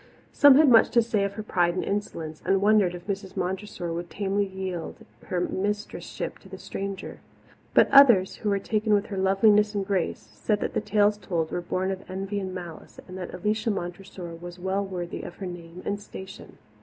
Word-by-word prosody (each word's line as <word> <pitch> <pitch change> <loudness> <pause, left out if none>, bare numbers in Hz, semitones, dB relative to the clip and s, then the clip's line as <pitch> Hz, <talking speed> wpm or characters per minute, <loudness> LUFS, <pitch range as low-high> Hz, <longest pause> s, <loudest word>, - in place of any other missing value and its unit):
Some 285 -2 +8
had 300 +2 +6
much 235 -4 +7
to - - +8
say 220 -3 0
of 200 - -3
her 215 +1 -6
pride 175 -4 +1
and 185 - -1
insolence, 165 -6 -4
and 195 - +2
wondered 200 -3 +3
if 175 - -10
Mrs. 195 -2 -5
Montressor 180 -2 -3
would 170 +1 -5
tamely 200 0 -1
yield 190 -3 -6 0.2
her 180 - -1
mistress 205 +4 -2
ship - - -6
to - - -16
the - - -8
stranger. 195 -1 -6 0.6
But - - +7
others, 240 -9 +7
who 210 - -2
were 200 - +2
taken 215 +1 +1
with 205 0 +1
her 200 - -6
loveliness 210 +2 +4
and 200 -1 -1
grace, 190 -4 0 0.2
said 155 - 0
that - - -2
the - - 0
tales 210 0 +2
told 165 -6 -2
were 175 - -2
born 185 +2 -1
of 190 0 -4
envy 195 +2 -3
and 190 -1 -4
malice, 175 -3 -9
and 185 - -9
that 180 - -6
Alicia 215 +4 -1
Montressor 175 -2 -5
was 175 +1 -9
well 190 +2 -1
worthy 180 -3 -5
of 175 - -8
her 195 - -7
name 175 0 -8
and 205 0 -2
station. 190 -1 -10
195 Hz, 205 wpm, -26 LUFS, 180-205 Hz, 0.6 s, Some